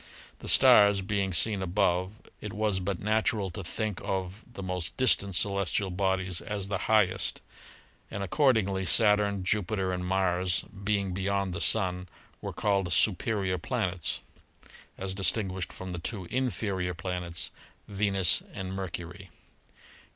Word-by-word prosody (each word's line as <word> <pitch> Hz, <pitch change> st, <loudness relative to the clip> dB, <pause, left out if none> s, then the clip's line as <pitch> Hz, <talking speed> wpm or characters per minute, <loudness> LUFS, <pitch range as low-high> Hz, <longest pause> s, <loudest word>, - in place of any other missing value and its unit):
The -, -, -9 dB
stars 100 Hz, -1 st, +6 dB
being 100 Hz, 0 st, -1 dB
seen 100 Hz, +3 st, +2 dB
above, 95 Hz, +1 st, 0 dB, 0.2 s
it 105 Hz, -2 st, -6 dB
was 105 Hz, -3 st, 0 dB
but 95 Hz, -1 st, -3 dB
natural 105 Hz, -2 st, 0 dB
to 95 Hz, -, -6 dB
think 105 Hz, +2 st, -3 dB
of 95 Hz, +2 st, -3 dB
the 100 Hz, -, -8 dB
most 90 Hz, -2 st, -1 dB
distant 100 Hz, -7 st, +2 dB
celestial 100 Hz, 0 st, 0 dB
bodies 95 Hz, -1 st, -1 dB
as 100 Hz, -2 st, -3 dB
the 100 Hz, -2 st, -1 dB
highest, 105 Hz, -4 st, +2 dB, 0.7 s
and 100 Hz, -, -4 dB
accordingly 100 Hz, -, +2 dB
Saturn, 105 Hz, -1 st, +4 dB
Jupiter 95 Hz, -1 st, 0 dB
and 90 Hz, 0 st, -3 dB
Mars, 90 Hz, -1 st, +1 dB
being 100 Hz, -1 st, -1 dB
beyond 100 Hz, 0 st, -1 dB
the 85 Hz, -, -4 dB
Sun, 90 Hz, -4 st, +2 dB, 0.3 s
were -, -, -4 dB
called 100 Hz, -4 st, 0 dB
"superior 95 Hz, -1 st, +1 dB
planets" 90 Hz, +1 st, -2 dB, 0.8 s
as 95 Hz, 0 st, -4 dB
distinguished 95 Hz, -1 st, 0 dB
from 95 Hz, 0 st, -7 dB
the 90 Hz, -, -4 dB
two 95 Hz, +2 st, -4 dB
"inferior 100 Hz, -8 st, -1 dB
planets," 90 Hz, -1 st, -4 dB, 0.4 s
Venus 100 Hz, -3 st, +2 dB
and 95 Hz, 0 st, -5 dB
Mercury. 95 Hz, 0 st, -6 dB
95 Hz, 130 wpm, -28 LUFS, 90-105 Hz, 0.8 s, stars